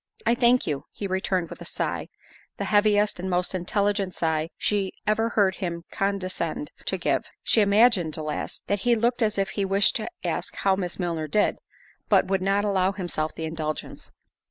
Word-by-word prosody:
"I -, -, +4 dB
thank 245 Hz, 0 st, +4 dB
you," 145 Hz, -3 st, -3 dB
he 205 Hz, -, -6 dB
returned 190 Hz, -2 st, -1 dB
with -, -, -9 dB
a -, -, -7 dB
sigh—the -, -, -6 dB
heaviest 205 Hz, -1 st, +3 dB
and 190 Hz, +1 st, -3 dB
most 180 Hz, +1 st, 0 dB
intelligent 195 Hz, +1 st, 0 dB
sigh 160 Hz, -1 st, 0 dB
she 200 Hz, -2 st, 0 dB
ever 220 Hz, +2 st, +2 dB
heard 195 Hz, -4 st, +2 dB
him 170 Hz, -3 st, -4 dB
condescend 195 Hz, -, -2 dB
to -, -, -1 dB
give. -, -, 0 dB, 0.2 s
She 225 Hz, -, +4 dB
imagined, 200 Hz, -5 st, +4 dB
alas, 155 Hz, -1 st, -3 dB
that 205 Hz, -, 0 dB
he 240 Hz, +3 st, +3 dB
looked 240 Hz, +2 st, +1 dB
as 215 Hz, -2 st, +1 dB
if 195 Hz, -1 st, +1 dB
he 200 Hz, -, -2 dB
wished 195 Hz, +1 st, +3 dB
to 220 Hz, -, -4 dB
ask -, -, -2 dB
how 195 Hz, -1 st, +2 dB
Miss 180 Hz, -2 st, -1 dB
Milner 170 Hz, -4 st, -2 dB
did, 205 Hz, +8 st, +1 dB, 0.5 s
but -, -, +5 dB
would 190 Hz, 0 st, 0 dB
not 200 Hz, +2 st, +1 dB
allow 195 Hz, -1 st, +2 dB
himself 175 Hz, -5 st, -3 dB
the 160 Hz, -, -4 dB
indulgence. 155 Hz, -1 st, -5 dB
195 Hz, 180 wpm, -25 LUFS, 175-210 Hz, 0.5 s, but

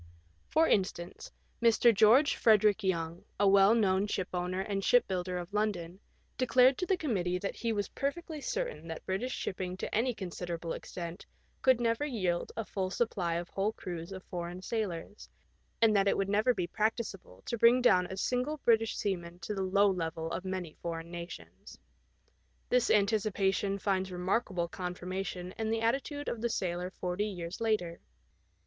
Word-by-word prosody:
For 320 Hz, +1 st, +4 dB
instance, 185 Hz, -3 st, -1 dB, 0.3 s
Mr. 235 Hz, 0 st, +5 dB
George 225 Hz, +8 st, +5 dB
Frederick 215 Hz, -1 st, +4 dB
Young, 170 Hz, -2 st, -1 dB, 0.2 s
a 205 Hz, -, +4 dB
well 195 Hz, +2 st, +6 dB
known 195 Hz, -2 st, +2 dB
shipowner 185 Hz, -1 st, -2 dB
and 195 Hz, 0 st, -2 dB
shipbuilder 185 Hz, -7 st, +2 dB
of 175 Hz, +2 st, -7 dB
London, 190 Hz, -4 st, -1 dB, 0.4 s
declared 255 Hz, +1 st, +5 dB
to 365 Hz, -, -1 dB
the 380 Hz, -, +2 dB
committee 185 Hz, -, -1 dB
that 195 Hz, +2 st, -4 dB
he 230 Hz, -, -1 dB
was 205 Hz, -2 st, -1 dB
perfectly 305 Hz, +2 st, -4 dB
certain -, -, -3 dB
that 160 Hz, -1 st, -7 dB
British 195 Hz, +7 st, -2 dB
shipping 185 Hz, -1 st, -4 dB
to -, -, -5 dB
any 235 Hz, +2 st, +1 dB
considerable 175 Hz, -3 st, -5 dB
extent 170 Hz, +1 st, -7 dB, 0.3 s
could 260 Hz, -2 st, +4 dB
never 230 Hz, +2 st, +1 dB
yield 185 Hz, -11 st, -1 dB
a 225 Hz, -, -2 dB
full 190 Hz, -3 st, -2 dB
supply 185 Hz, -5 st, -1 dB
of 170 Hz, +1 st, -3 dB
whole 200 Hz, +3 st, -1 dB
crews 170 Hz, -3 st, -6 dB
of 190 Hz, -1 st, -7 dB
foreign 175 Hz, 0 st, -6 dB
sailors, 205 Hz, -3 st, -4 dB, 0.5 s
and 220 Hz, -2 st, +5 dB
that 200 Hz, 0 st, +3 dB
it -, -, +3 dB
would 195 Hz, 0 st, 0 dB
never 215 Hz, +5 st, +3 dB
be 180 Hz, -, -1 dB
practicable 205 Hz, -, -3 dB
to -, -, -2 dB
bring 235 Hz, +2 st, +6 dB
down 180 Hz, -8 st, +4 dB
a 190 Hz, -, -7 dB
single 250 Hz, +8 st, -1 dB
British 225 Hz, -1 st, +3 dB
seaman 175 Hz, -4 st, -3 dB
to 180 Hz, +4 st, -5 dB
the 195 Hz, -, -2 dB
low 200 Hz, +2 st, +3 dB
level 165 Hz, -3 st, -2 dB
of -, -, -3 dB
many 185 Hz, -4 st, -4 dB
foreign 165 Hz, 0 st, -5 dB
nations. 170 Hz, 0 st, -9 dB, 0.9 s
This 250 Hz, -1 st, +3 dB
anticipation 200 Hz, -2 st, +2 dB
finds 190 Hz, -1 st, -1 dB
remarkable 180 Hz, 0 st, -1 dB
confirmation 180 Hz, +1 st, -5 dB
in 220 Hz, -1 st, -1 dB
the 225 Hz, 0 st, 0 dB
attitude 275 Hz, +5 st, -1 dB
of 225 Hz, -, -3 dB
the 235 Hz, -, 0 dB
sailor 180 Hz, -3 st, -2 dB
forty 185 Hz, +3 st, -2 dB
years 180 Hz, 0 st, -6 dB
later. 210 Hz, -7 st, 0 dB
195 Hz, 165 wpm, -31 LUFS, 180-225 Hz, 0.9 s, well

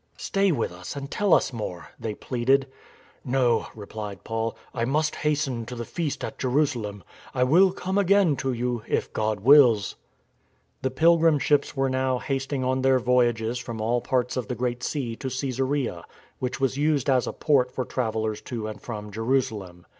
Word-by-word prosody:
" -, -, -38 dB
Stay 195 Hz, -1 st, +1 dB
with 125 Hz, -, -1 dB
us 90 Hz, +6 st, -8 dB
and 140 Hz, -1 st, -6 dB
tell 205 Hz, -2 st, 0 dB
us 135 Hz, -, +4 dB
more," 90 Hz, -6 st, -5 dB
they 110 Hz, -2 st, -4 dB
pleaded. 130 Hz, +2 st, +1 dB, 0.3 s
" -, -, -30 dB, 0.2 s
No," 120 Hz, -3 st, +2 dB
replied 105 Hz, -1 st, -7 dB
Paul, 115 Hz, 0 st, -2 dB
" -, -, -29 dB
I 115 Hz, -, -1 dB
must 150 Hz, +5 st, 0 dB
hasten 145 Hz, -5 st, 0 dB
to 125 Hz, -, -6 dB
the 120 Hz, 0 st, -5 dB
Feast 160 Hz, +1 st, -3 dB
at -, -, -5 dB
Jerusalem. 125 Hz, -7 st, 0 dB, 0.3 s
I 125 Hz, -, +3 dB
will 180 Hz, +9 st, +5 dB
come 190 Hz, +1 st, -1 dB
again 200 Hz, -5 st, +4 dB
to 135 Hz, -, -1 dB
you, 120 Hz, -1 st, -2 dB
if -, -, -1 dB
God 110 Hz, -2 st, -1 dB
wills." 120 Hz, -5 st, +6 dB, 0.8 s
The 130 Hz, -, 0 dB
pilgrim 165 Hz, +3 st, +4 dB
ships 145 Hz, 0 st, +1 dB
were 135 Hz, 0 st, +2 dB
now 130 Hz, 0 st, 0 dB
hasting 135 Hz, +1 st, -2 dB
on 130 Hz, +1 st, 0 dB
their 130 Hz, 0 st, +4 dB
voyages 120 Hz, -2 st, +1 dB
from 115 Hz, -2 st, -6 dB
all 120 Hz, +3 st, +1 dB
parts 125 Hz, 0 st, 0 dB
of 125 Hz, -, -3 dB
the 125 Hz, -, -3 dB
Great 120 Hz, 0 st, -2 dB
Sea 130 Hz, -5 st, -2 dB
to 135 Hz, -, -5 dB
Cassarea, 130 Hz, -6 st, -2 dB, 0.4 s
which 125 Hz, 0 st, -3 dB
was 135 Hz, 0 st, 0 dB
used 150 Hz, -2 st, +1 dB
as 130 Hz, -2 st, +3 dB
a -, -, -1 dB
port 130 Hz, -5 st, +2 dB
for 130 Hz, -, -3 dB
travellers 110 Hz, -3 st, -2 dB
to 115 Hz, -3 st, -5 dB
and 110 Hz, 0 st, -6 dB
from 105 Hz, -3 st, -6 dB
Jerusalem. 110 Hz, -6 st, -2 dB
125 Hz, 185 wpm, -25 LUFS, 115-140 Hz, 0.8 s, wills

